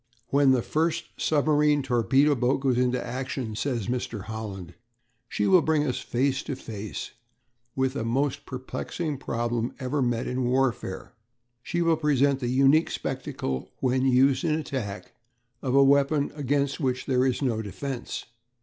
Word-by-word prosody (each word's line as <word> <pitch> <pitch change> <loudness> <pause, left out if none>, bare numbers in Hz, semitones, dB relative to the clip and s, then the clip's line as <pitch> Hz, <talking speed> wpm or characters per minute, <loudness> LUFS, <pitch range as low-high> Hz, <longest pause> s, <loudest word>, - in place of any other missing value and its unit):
"When 140 +1 +4
the 130 -3 +3
first 165 +2 -1
submarine 150 -1 +2
torpedo 130 +4 +3
boat 125 +1 +1
goes 135 -2 +2
into 125 0 +1
action," 125 -2 -4
says 115 -1 -2
Mr. 120 -3 -3
Holland, 105 -5 -6 0.6
"she 105 - -1
will 185 - +6
bring 155 -2 +1
us 130 -4 -1
face 135 +2 0
to 140 - -4
face 110 -5 -6 0.6
with 130 0 +1
the 115 - -3
most 140 +4 -1
perplexing 140 +3 -4
problem 120 -2 -2
ever 135 +2 -1
met 120 -2 0
in 125 0 -1
warfare. 130 0 -1 0.5
She 170 +7 -1
will 165 -1 +3
present 140 -3 +2
the 125 - -2
unique 135 +5 +4
spectacle, 65 -1 -4
when 130 0 +1
used 130 +4 +4
in 160 -3 +2
attack, 130 -10 -4 0.5
of 130 0 -1
a 140 - +7
weapon 140 +1 +3
against 140 0 0
which 130 -3 -1
there 130 -2 +2
is 130 +1 0
no 115 -4 0
defence.... 125 +5 -5
130 Hz, 150 wpm, -26 LUFS, 120-145 Hz, 0.6 s, a